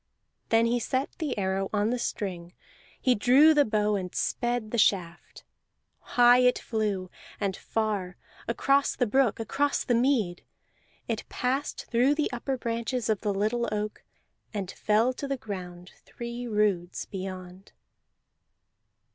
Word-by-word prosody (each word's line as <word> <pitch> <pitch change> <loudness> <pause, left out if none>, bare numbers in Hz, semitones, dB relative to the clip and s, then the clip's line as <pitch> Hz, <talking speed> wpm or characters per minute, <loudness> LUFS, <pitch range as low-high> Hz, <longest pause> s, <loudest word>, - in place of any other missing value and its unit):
Then 225 0 +4
he 240 +1 +1
set 260 +3 -1
the 300 -8 -2
arrow 190 0 -1
on 210 +1 +1
the 250 - -1
string; 180 -6 -4 0.5
he 255 - +3
drew 260 +8 +6
the 295 -1 +5
bow 210 -3 +1
and 185 -2 -4
sped 240 -3 -1
the 235 - 0
shaft. 175 -5 0 0.7
High 245 0 +7
it 250 0 +4
flew, 205 -5 -2 0.3
and 195 -2 -1
far 205 -6 -2 0.3
across 275 0 +2
the 245 - +1
brook, 240 0 +2
across 280 +6 0
the 245 - 0
mead. 235 -8 +1 0.6
It - - -3
passed 265 +3 -2
through 255 +5 +3
the 300 - 0
upper 260 +2 -2
branches 235 0 -2
of 215 -2 +1
the 210 - 0
little 215 +4 0
oak, 210 0 -3 0.5
and 195 -3 -3
fell 220 +4 +2
to 280 - -5
the 275 0 -2
ground 180 -5 -7
three 240 +1 -6
roods 205 -5 0
beyond. 185 -1 -8
220 Hz, 140 wpm, -27 LUFS, 195-245 Hz, 0.7 s, High